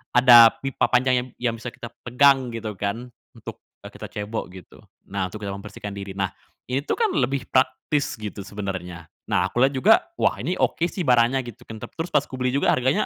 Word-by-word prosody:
ada 120 -2 +8
pipa 135 -1 0
panjang 130 +1 +3
yang 125 - -6
yang 120 -2 0
bisa 120 - -7
kita 120 -1 -8 0.2
pegang, 135 +1 +4
gitu 110 -2 -4
kan, 115 +5 -3 0.2
untuk, - - -9 0.2
eee, - - -9
kita - - -9
cebok, 105 +2 -5
gitu. 95 - -14 0.3
Nah, 100 -2 -1
untuk 105 +4 -9
kita 100 - -3
membersihkan 100 +1 -8
diri. 100 -1 -7
Nah, 95 -1 -1 0.4
ini 130 - +1
tuh - - +1
kan 445 -4 +1
lebih 135 -2 0
praktis, 140 +2 0
gitu, 105 -1 -6
sebenarnya. 95 -4 -6 0.2
Nah, 100 -4 +2
aku 120 - -2
lihat 135 +1 +3
juga, 205 +12 +6 0.2
"Wah, - - +1
ini 180 +2 -2
oke 170 +1 +1
sih, 180 -1 -4
barangnya," 125 +1 +3
gitu 120 - -11
kan. 110 - -7
Tap - - -10
terus, 165 +1 -4
pas 145 -1 +2
kubeli 130 -1 -2
juga, 140 +2 +2
harganya, 130 +2 +1
120 Hz, 205 wpm, -23 LUFS, 100-130 Hz, 0.4 s, ada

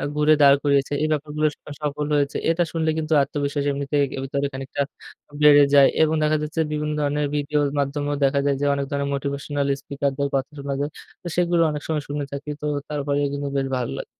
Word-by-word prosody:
ঘুরে 150 +1 +4
দাঁড় 140 -1 +8
করিয়েছে। 140 -1 +2
এই - - +2
ব্যাপারগুলো 150 0 -1
স - - -19 0.3
সফল 150 0 -2
হয়েছে। 140 -1 0
এটা 165 +1 +2
শুনলে 160 -1 0
কিন্তু 160 0 -1
আত্মবিশ্বাস 145 0 -2
এমনিতে 140 +1 -3 0.2
এ - - -3
ভিতরে 140 +1 -1
খানিকটা 135 +1 -4 0.6
বেড়ে 145 -1 +8
যায়। 140 -1 +8
এবং 160 0 +3
দেখা 155 0 +2
যাচ্ছে 155 +2 -4
বিভিন্ন 150 0 -2
ধরনের 145 +1 0
ভিডিওর 145 0 0
মাধ্যমেও 145 +1 -1
দেখা 135 +1 +2
যায় 140 - +2
যে, 145 - +1
অনেক 140 0 -1
ধরনের 140 0 -1
motivational 140 +1 -2 0.2
speaker 140 0 -2
দের 140 - 0
কথা 135 +2 -1
শোনা 140 0 -3
যায়। 145 +1 -2 0.3
তো - - -6
সেগুলো 175 -1 +2
অনেক 150 -1 -4
সময় 155 -2 -1
শুনে 145 0 -2
থাকি। 140 +1 -6
তো 150 - -4 0.2
তারপরে 145 -1 -1
কিন্তু 140 0 -3
বেশ 135 - -1
ভালো 125 - -3
লাগ - - -5
145 Hz, 205 wpm, -23 LUFS, 140-150 Hz, 0.6 s, দাঁড়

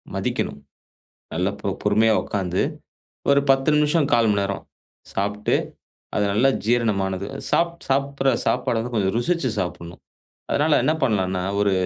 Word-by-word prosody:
மதிக்கணும். 70 - -2 0.8
நல்ல 90 +3 +1
ப 100 - -1
பொறுமையா 110 +2 +3
உக்காந்து 95 -3 -1 0.7
ஒரு 140 0 +5
10 135 +1 +3
நிமிஷம், 150 0 +2
1/4 115 -2 +4
மணி 100 -1 +2
நேரம் 100 0 -3 0.5
சாப்ட்டு, 105 +1 0 0.6
அது 105 - +2
நல்லா 125 +6 +4 0.2
ஜீரணமானது 100 -5 0 0.2
சாப் 170 0 +2 0.2
சாப்டுற 135 0 0 0.2
சாப்பாடு 115 - +1
வந்து 120 +2 -5
கொஞ்சம் 95 -1 +1
ருசிச்சு 165 +2 0
சாப்பிட்ணும். 85 -1 -6 0.5
அதனால 150 +1 +3
என்ன 150 - +3
பண்ணலான்னா 95 -6 +1 0.2
ஒரு 100 -1 +3
110 Hz, 130 wpm, -23 LUFS, 100-135 Hz, 0.8 s, ஒரு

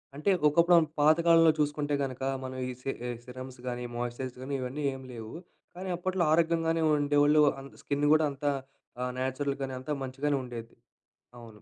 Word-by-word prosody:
అంటే, 150 +7 -1 0.2
ఒకప్పుడాను 170 +1 +5
పాతకాలంలో 165 +2 +6
చూసుకుంటే 145 0 0
గనక, 130 -1 -5 0.2
మనం 130 0 -6
ఈ - - -3
సి - - -4 0.2
ఆహ్, 120 - -5
సిరమ్స్ 130 0 -9
గానీ, 125 0 -3
మాయిశ్చరైజ్ 120 +1 -4
గానీ, 140 +2 -5
ఇవన్నీ 130 +4 -4
ఏమి 130 0 -9
లేవు, 110 -2 -8 0.4
కానీ 185 +1 -6
అప్పట్లో 185 0 -1
ఆరోగ్యంగానే 165 0 +2
ఉండేవోళ్ళు, 145 +1 +4 0.2
అంత 135 - -12
స్కిన్ను 145 +1 0
గూడా 155 0 +4
అంతా 145 +1 -1 0.5
ఆహ్, 125 0 -2
న్యాచురల్‍గానే 135 0 -2
అంతా 130 +4 -6
మంచిగానే 140 +2 -1
ఉండేది. 115 -2 -8 0.7
అవును. 110 -3 -13
140 Hz, 155 wpm, -29 LUFS, 130-155 Hz, 0.7 s, పాతకాలంలో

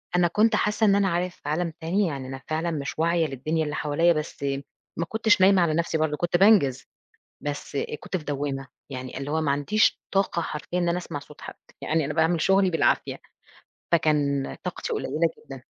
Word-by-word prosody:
أنا 180 -1 +4
كنت 215 +5 +3
حاسة 210 +1 +1
إن 200 - +5
أنا 200 -1 +3
عارف 175 +1 -1
في 145 - -8
عالم 170 +2 -1
تاني 185 +5 +1
يعني 135 -4 -5
أنا 135 0 -7
فعلًا 160 +2 -1
مش 145 -1 -4
واعية 170 0 +2
للدنيا 155 +4 -2
اللي 150 -1 -3
حواليّا 160 +4 +2
بس 155 -2 -5 0.5
ما 170 - -1
كُنتش 220 -2 +3
نايمة 190 -1 +6
على 160 -2 +2
نَفْسي 165 0 0
برضه، 155 -1 0
كُنت 175 +1 +1
بانجز، 175 - +4 0.6
بس 145 -1 -5 0.2
كُنت - - -3
في 155 - -7
دوامة، 140 -1 -3 0.2
يعني 130 -1 -6
اللي 140 +1 -5
هو 160 +1 +1
ما 145 -3 +1
عنديش 170 +10 +2
طاقة 195 -3 +1
حرفيًا 160 +4 -4
إن 175 -1 +1
أنا 170 +1 +1
أسمَع 165 -4 -5
صوت 150 +1 -15
حد. - - -8 0.3
يعني 160 -1 0
أنا 150 +1 -3
باعمل 165 +1 +2
شغلي 195 +1 +3
بالعافية. 165 - +1 0.7
فكان 145 -4 +1
طاقتي 485 - -4
قليلة 430 - 0 0.2
جدًا. - - -10
160 Hz, 195 wpm, -25 LUFS, 145-180 Hz, 0.7 s, نايمة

